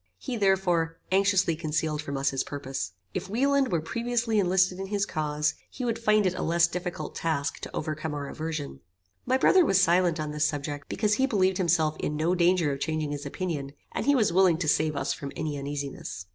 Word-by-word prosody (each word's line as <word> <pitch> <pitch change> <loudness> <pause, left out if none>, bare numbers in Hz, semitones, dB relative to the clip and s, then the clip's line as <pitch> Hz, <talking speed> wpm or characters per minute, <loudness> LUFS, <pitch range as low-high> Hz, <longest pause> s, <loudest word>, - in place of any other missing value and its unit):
He, 245 - -5
therefore, 180 -5 +1
anxiously 190 -3 +3
concealed 155 -1 -1
from 140 -2 -4
us 135 0 +1
his 135 - -1
purpose. 135 - -5 0.2
If 185 +1 -4
Wieland 275 +4 +2
were 170 -3 +1
previously 235 +2 0
enlisted 185 -1 +2
in 195 - -4
his 200 0 0
cause, 150 -3 -1 0.2
he 255 - -5
would 230 -2 -1
find 215 -2 +3
it 185 - +2
a 185 - -4
less 170 +1 +3
difficult 175 -3 -4
task 155 -3 -2
to - - -8
overcome 155 0 -3
our 140 -1 -4
aversion. 155 - -5 0.5
My 260 - +3
brother 365 +7 +5
was 195 - +3
silent 175 -2 +3
on 155 -1 -3
this 150 0 +1
subject, 145 0 -4
because 210 -1 +1
he 265 +5 +2
believed 190 -6 +1
himself 160 -3 +2
in 150 - -2
no 160 +4 +1
danger 175 -3 +3
of 135 - -5
changing 155 0 -2
his 145 0 -4
opinion, 145 -4 -4 0.2
and - - -3
he 285 - +5
was 215 -9 +2
willing 185 -3 +5
to 165 -2 -2
save 155 0 +2
us 140 - -1
from 140 -1 -7
any 155 -2 -3
uneasiness. 140 -10 -5
165 Hz, 205 wpm, -27 LUFS, 150-190 Hz, 0.5 s, brother